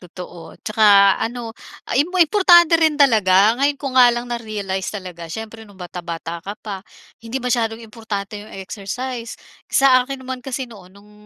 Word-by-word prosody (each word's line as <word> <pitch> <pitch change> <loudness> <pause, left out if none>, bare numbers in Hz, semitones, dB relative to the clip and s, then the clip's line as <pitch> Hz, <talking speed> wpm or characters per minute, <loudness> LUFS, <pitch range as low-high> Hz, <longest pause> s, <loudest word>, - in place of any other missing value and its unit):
totoo. 180 -1 -11
At - - -43
saka, 205 -2 +5
ano, 230 0 -4 0.3
ah, - - -6
im 300 - 0
importante 345 -1 +5
rin 315 -2 +3
talaga, 215 -7 +4
ngayon 285 +1 +2
ko 275 -2 -5
nga 250 -1 +7
lang 240 0 -1
na-realize 215 -6 -4
talaga. 180 -5 -8
Siyempre 220 +4 -8
no'ng 200 - -17
bata-bata 170 -2 -7
ka 200 +5 -7
pa, 200 -3 -5 0.4
hindi 230 +2 -6
masyadong 235 -3 -1
importante 210 -2 -6
'yong 210 -1 -12
exercise. 230 +5 -6 0.3
Sa 265 -2 +5
akin 260 +1 -6
naman 260 0 -5
kasi 265 +1 -4
noon 200 -6 -15
no'ng 205 +1 -19
225 Hz, 165 wpm, -20 LUFS, 195-255 Hz, 0.4 s, nga